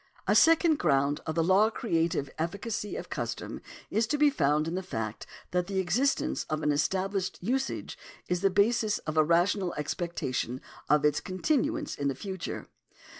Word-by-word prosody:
A - - +4
second 325 -1 +5
ground 140 -2 +2
of 160 - -2
the 165 - +2
law 190 +5 +4
creative 165 - 0
efficacy 200 +5 -3
of - - -7
custom - - -4 0.3
is 220 +1 +1
to 295 - 0
be 295 0 +5
found 150 - +1
in 165 - -3
the 185 - -1
fact 110 - -5 0.2
that 180 0 0
the 195 -1 -3
existence 205 +10 +1
of 155 0 -2
an 150 - +3
established 190 +5 -1
usage 265 +8 -2 0.3
is 180 0 -1
the 195 - +4
basis 210 +2 +2
of 155 - -3
a 155 - +5
rational 175 +3 +2
expectation 150 -6 -3 0.3
of 150 +1 +4
its 150 0 +3
continuance 295 - -1
in 140 - -2
the 135 - -1
future. 190 +4 -5
180 Hz, 170 wpm, -29 LUFS, 155-215 Hz, 0.3 s, second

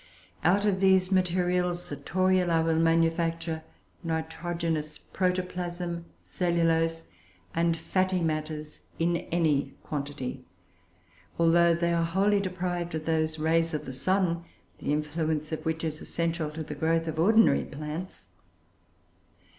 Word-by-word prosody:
Out 195 +4 +3
of 195 -2 +2
these 190 -1 +4
materials 180 -1 +1
the 145 - -3
Toruloe 180 +2 +2
will 160 -1 +2
manufacture 165 0 +1 0.4
nitrogenous 160 -1 -2
protoplasm, 180 -2 -2 0.2
cellulose, 165 -2 +1 0.4
and 165 0 +1
fatty 185 +2 0
matters, 155 -2 -3 0.2
in 170 +1 +2
any 150 -5 +1
quantity, 140 -3 -4 0.9
although 170 0 +5
they 170 0 +1
are 170 0 +2
wholly 195 +5 +2
deprived 180 -3 -2
of 155 0 -4
those 160 -1 +1
rays 165 +1 +1
of 150 - -4
the 130 - -6
sun, 175 +3 +1 0.4
the - - -2
influence 155 +1 -1
of 160 - -3
which 160 0 -1
is 155 -2 -3
essential 165 -2 -2
to 160 +1 -5
the 150 - -6
growth 165 +2 +1
of 160 0 -3
ordinary 220 +6 +5
plants. 150 - -7
165 Hz, 125 wpm, -28 LUFS, 160-180 Hz, 0.9 s, although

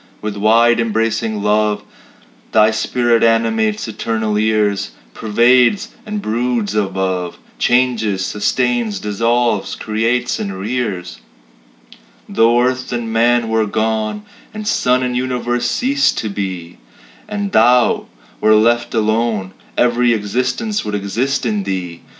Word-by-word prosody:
With 105 -1 -4
wide 115 +3 +4
embracing 110 -1 -1
love 105 0 +1 0.7
Thy 110 0 +5
spirit 115 +1 +1
animates 110 -2 +1
eternal 110 -1 -2
years 105 - 0 0.2
Pervades 125 - +3 0.2
and 210 -1 -4
broods 115 -2 -1
above, 95 -3 -2 0.2
Changes, 115 -6 +1
sustains, 115 +1 -1
dissolves, 115 +1 0
creates, 115 +3 -1
and 100 -2 -4
rears. 105 -3 -4 1.1
Though 115 +3 +3
earth 130 +1 -1
and 120 -2 -3
man 120 +1 +2
were 110 -1 +1
gone, 110 - -1 0.3
And 215 -1 -6
suns 125 -8 +2
and 125 -1 -2
universes 125 -1 -1
ceased 270 - +1
to 110 - -2
be, 95 -4 -5 0.5
And 205 -1 -3
Thou 120 +2 +3 0.3
were 110 0 +4
left 120 +3 +2
alone, 110 -3 0 0.2
Every 120 0 +3
existence 130 - -2
would 105 - -3
exist 110 +8 -1
in 105 -3 0
Thee. 90 -3 -4
115 Hz, 115 wpm, -17 LUFS, 105-120 Hz, 1.1 s, Thy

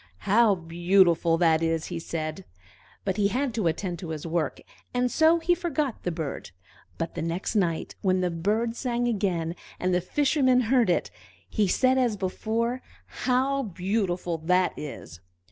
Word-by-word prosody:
"How 210 0 +5
beautiful 170 0 +3
that 165 -2 +3
is!" 165 -1 0
he 170 - -3
said; 160 +2 -4 0.6
but 190 0 -1
he 205 -1 +3
had 255 +4 -1
to 215 -6 0
attend 175 +1 -2
to 170 - -7
his 155 -1 -5
work, 165 -3 -1 0.4
and 250 0 +1
so 320 +1 +5
he 335 +1 +2
forgot 305 - -2
the 180 - -2
bird. 160 - -5 0.5
But 165 - -3
the - - -4
next 170 +6 -3
night, 170 -6 0
when 185 -1 +2
the 180 -1 0
bird 215 +8 0
sang 240 -1 -1
again, 180 -7 -1 0.2
and 185 0 0
the 180 - +2
Fisherman 260 - +2
heard 240 -2 +3
it, 175 - +1 0.4
he 210 -3 +1
said 260 +7 +3
as 240 -5 +1
before, 225 +6 -2 0.2
"How 265 +2 0
beautiful 180 -4 -2
that 180 +3 +2
is!" 135 - -8
190 Hz, 160 wpm, -26 LUFS, 170-240 Hz, 0.6 s, How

